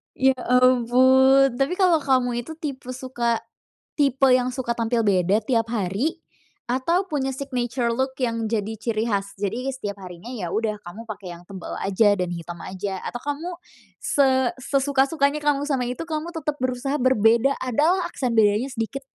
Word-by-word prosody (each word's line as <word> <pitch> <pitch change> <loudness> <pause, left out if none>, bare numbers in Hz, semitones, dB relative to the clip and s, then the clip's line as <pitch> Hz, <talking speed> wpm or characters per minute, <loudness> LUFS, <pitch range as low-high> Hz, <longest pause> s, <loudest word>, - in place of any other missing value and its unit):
Ya 265 0 +3
ampun, 255 +1 +4
tapi 270 +6 0
kalo 345 -6 +4
kamu 245 -3 +1
itu 280 - -9
tipe 270 -5 -5
suka, 245 -3 -1 0.6
tipe 275 -2 +3
yang 255 0 +1
suka 250 -2 -3
tampil 230 -1 0
beda 190 +2 +3
tiap 230 -1 0
hari, 230 - -1 0.5
atau 335 +10 0
punya 275 -5 -1
signature 250 -3 -2
look 265 +2 0
yang 230 -3 -1
jadi 220 -1 -1
ciri 220 +1 -2
khas? 200 -3 -1
Jadi 230 +7 -2
setiap 205 -7 -6
harinya 180 +3 -10
ya 180 -7 -4
udah 215 -1 -1
kamu 210 +7 -10
pake 185 -3 -9
yang 170 0 -11
tebel 190 -3 -8
aja 200 +2 +3
dan 180 - 0
hitam 170 0 -7
aja 190 0 -4
atau 240 - -5
kamu 290 +4 -3 0.5
se 280 -1 +3 0.3
sesuka-sukanya 280 +2 +1
kamu 290 -1 +2
sama 260 -4 0
itu 250 +6 -4
kamu 325 +1 -4
tetep 300 -2 -2
berusaha 255 +3 -1
berbeda, 245 +1 +3
ada 255 +3 +1 0.2
lah - - -1
aksen 245 -4 -2
bedanya 215 +3 +3
sedikit? 255 +3 -4
250 Hz, 165 wpm, -23 LUFS, 220-270 Hz, 0.6 s, ampun